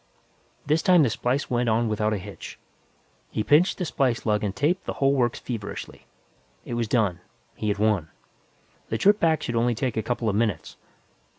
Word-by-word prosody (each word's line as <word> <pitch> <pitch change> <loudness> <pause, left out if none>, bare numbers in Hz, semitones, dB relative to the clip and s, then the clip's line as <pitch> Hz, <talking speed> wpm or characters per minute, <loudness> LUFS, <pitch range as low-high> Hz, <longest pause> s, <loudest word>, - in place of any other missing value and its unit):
This 155 +2 +2
time 180 -2 +5
the 125 - +1
splice 125 +5 -1
went 120 -1 +1
on 115 +1 +2
without 110 0 0
a 105 - 0
hitch. 100 +1 -9 0.7
He 110 - -2
pinched 155 - +4
the 180 - -2
splice 130 -5 0
lug 105 -1 +1
and 100 -2 -2
taped 155 +9 0
the - - -3
whole 135 0 +2
works 120 -4 +1
feverishly. 115 -5 -7 0.6
It - - -6
was 120 -1 -1
done; 105 -6 +1 0.4
he 110 - -4
had 105 -1 0
won. 105 -7 +1 0.8
The - - -1
trip 205 +3 +4
back 160 -2 +2
should - - -2
take 115 - +1
only 120 0 +1
a 120 -4 -1
couple 120 +1 -2
of 105 - +1
minutes. 105 -8 -1
120 Hz, 190 wpm, -25 LUFS, 105-140 Hz, 0.8 s, time